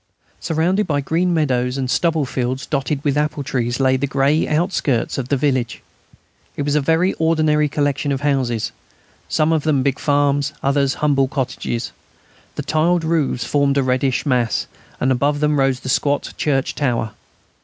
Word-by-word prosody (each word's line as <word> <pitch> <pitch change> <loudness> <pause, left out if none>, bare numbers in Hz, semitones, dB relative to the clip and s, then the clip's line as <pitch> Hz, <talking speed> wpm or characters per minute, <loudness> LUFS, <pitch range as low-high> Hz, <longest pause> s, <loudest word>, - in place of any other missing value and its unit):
Surrounded 175 +6 0
by 145 -2 0
green 165 +6 0
meadows 130 -6 0
and 130 -1 -2
stubble 160 -4 +1
fields 130 +2 -3
dotted 140 0 -2
with 145 -2 +1
apple 150 -1 -1
trees, 120 -2 -2
lay 130 -1 +3
the 135 +2 -1
grey 140 +3 +1
outskirts 150 - 0
of 130 -1 -5
the 140 - +2
village 130 -4 -1 0.7
It 145 - -1
was 145 0 0
a 150 - +3
very 165 +6 +2
ordinary 155 -2 +2
collection 145 0 -1
of 135 -1 -2
houses, 130 -6 0 0.6
some 155 +1 +2
of 160 - +1
them 145 -3 +1
big 140 -1 0
farms, 145 0 +1
others 140 -1 +1
humble 135 -2 +3
cottages. 130 - -3 0.6
The - - -4
tiled 165 +2 +1
roofs 160 -6 0
formed 140 -1 +1
a 140 - +3
reddish 130 +1 0
mass, 125 -5 +1 0.3
and 130 - +1
above 145 +3 +1
them 150 -1 +1
rose 135 -1 +1
the - - -8
squat 140 +2 0
church 135 -3 0
tower. 120 -6 -1
140 Hz, 165 wpm, -20 LUFS, 130-150 Hz, 0.7 s, lay